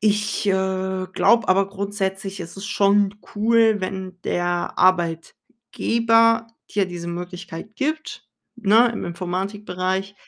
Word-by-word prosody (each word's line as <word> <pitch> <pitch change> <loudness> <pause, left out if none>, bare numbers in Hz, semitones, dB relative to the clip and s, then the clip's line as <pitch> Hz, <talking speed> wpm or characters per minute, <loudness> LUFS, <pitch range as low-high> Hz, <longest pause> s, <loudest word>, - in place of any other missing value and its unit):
ich, 210 0 +1
äh, 190 -1 0
glaube 235 +1 +3
aber 195 +1 +3
grundsätzlich, 195 -1 -3
es 170 +2 -8
ist 195 - -7
schon 205 0 +2 0.2
cool, 225 0 +4
wenn 185 -1 -5
der 175 0 -1
Arbeitgeber 225 +6 +1 0.2
dir 200 -2 +1
diese 175 -1 -6
Möglichkeit 180 +3 -7
gibt, 310 +2 -3 0.3
ne, 230 +2 +4
im - - -5
Informatikbereich, 185 +1 -3
195 Hz, 110 wpm, -22 LUFS, 185-215 Hz, 0.3 s, cool